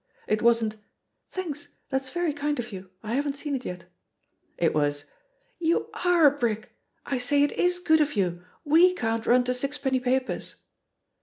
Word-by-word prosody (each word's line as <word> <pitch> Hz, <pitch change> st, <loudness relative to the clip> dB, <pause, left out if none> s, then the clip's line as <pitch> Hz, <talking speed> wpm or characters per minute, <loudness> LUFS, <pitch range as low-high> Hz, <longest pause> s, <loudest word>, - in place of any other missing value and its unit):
It 215 Hz, 0 st, 0 dB
wasn't, 230 Hz, -2 st, +3 dB, 0.5 s
"Thanks, 320 Hz, -6 st, -6 dB, 0.2 s
that's 265 Hz, -1 st, -1 dB
very 345 Hz, +1 st, -1 dB
kind 290 Hz, 0 st, -1 dB
of 240 Hz, -1 st, -4 dB
you, 190 Hz, -1 st, -8 dB
I 220 Hz, +1 st, -3 dB
haven't 280 Hz, +1 st, 0 dB
seen 285 Hz, 0 st, -4 dB
it 260 Hz, -2 st, -2 dB
yet;" 180 Hz, -1 st, -5 dB, 0.7 s
it 165 Hz, -, +2 dB
was, 145 Hz, -1 st, 0 dB, 0.5 s
"You 335 Hz, 0 st, +1 dB
are 355 Hz, -3 st, +5 dB
a 285 Hz, 0 st, +6 dB
brick! 220 Hz, -3 st, -1 dB, 0.3 s
I 265 Hz, -, -1 dB
say, 285 Hz, +3 st, +3 dB
it 290 Hz, -, +2 dB
is 355 Hz, 0 st, +1 dB
good 315 Hz, -3 st, +3 dB
of 295 Hz, 0 st, +1 dB
youl 175 Hz, -3 st, -1 dB, 0.2 s
xve 345 Hz, +5 st, +6 dB
can't 225 Hz, -1 st, -1 dB
nm 245 Hz, 0 st, +4 dB
to 250 Hz, -, +1 dB
sixpenny 265 Hz, 0 st, -1 dB
papers." 255 Hz, +1 st, -1 dB
265 Hz, 170 wpm, -26 LUFS, 225-295 Hz, 0.7 s, a